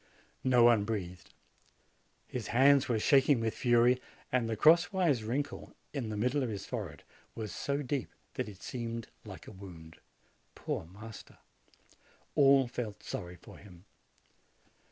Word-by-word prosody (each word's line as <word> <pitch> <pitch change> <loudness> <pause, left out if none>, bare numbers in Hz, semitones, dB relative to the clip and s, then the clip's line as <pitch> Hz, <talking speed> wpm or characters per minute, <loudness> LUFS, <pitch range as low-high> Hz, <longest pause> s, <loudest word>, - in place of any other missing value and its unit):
No 125 -2 +5
one 115 -3 +6
breathed. 95 -5 -5 1.0
His 125 -3 -5
hands 135 +2 +4
were 115 - +2
shaking 135 +3 +4
with 115 -1 -1
fury, 120 +1 +3 0.3
and 125 -3 +1
the 110 - -1
cross 170 +7 +5
wise 170 - +1
wrinkle 135 +6 -4 0.2
in 130 -7 -3
the 105 - -4
middle 125 +6 +1
of 125 - -1
his 100 -3 -5
forehead - - -6 0.3
was 110 -3 -5
so 140 +8 -2
deep 130 -2 -2 0.2
that - - -3
it 100 -2 -13
seemed 115 -2 -5 0.2
like - - -10
a - - -10
wound. 85 -4 -12 0.6
Poor - - -4
master! 105 +4 -12 1.0
All 135 -1 +5
felt 115 -4 -6
sorry 90 0 -6
for - - -14
him. 90 -2 -15
115 Hz, 145 wpm, -31 LUFS, 105-135 Hz, 1.0 s, one